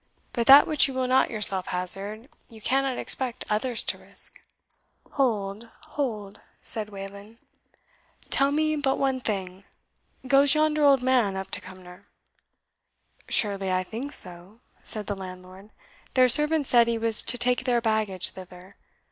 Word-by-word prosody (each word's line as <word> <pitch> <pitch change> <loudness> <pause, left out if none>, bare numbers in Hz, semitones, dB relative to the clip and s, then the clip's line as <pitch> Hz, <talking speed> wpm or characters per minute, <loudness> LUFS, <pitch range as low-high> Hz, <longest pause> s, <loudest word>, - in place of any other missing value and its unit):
But 235 -1 -2
that 280 +2 +9
which 305 -2 +2
you 270 - -8
will 260 0 -1
not 260 +1 +2
yourself 195 -4 0
hazard, 195 +6 -3 0.2
you 225 -2 -15
cannot 265 +3 -1
expect 255 -2 -3
others 225 +3 +1
to - - -4
risk." - - -1 0.7
"Hold, 220 -4 -2 0.2
hold," 215 -8 -5 0.2
said 215 -2 -1
Wayland; 200 +2 -11 0.9
"tell 275 +1 +1
me 310 +1 0
but 270 -2 -1
one 270 -1 -1
thing 190 -4 -5 0.6
goes 280 +1 +4
yonder 305 0 +1
old 275 -3 +4
man 245 -7 +1
up 190 - -7
to - - -3
Cumnor?" 185 -1 -14 1.2
"Surely, 200 -5 -1
I 185 0 0
think 235 +9 -7
so?" 185 +3 0 0.2
said 215 -1 +1
the 205 - -4
landlord; 185 +1 -12 0.5
"their 255 -1 +4
servant 300 +3 +6
said 235 -2 +3
he 230 -1 -1
was 225 -1 +2
to 240 +1 +1
take 245 +1 +2
their 245 -2 +1
baggage 215 -5 -1
thither. 185 0 -14
225 Hz, 150 wpm, -25 LUFS, 195-260 Hz, 1.2 s, that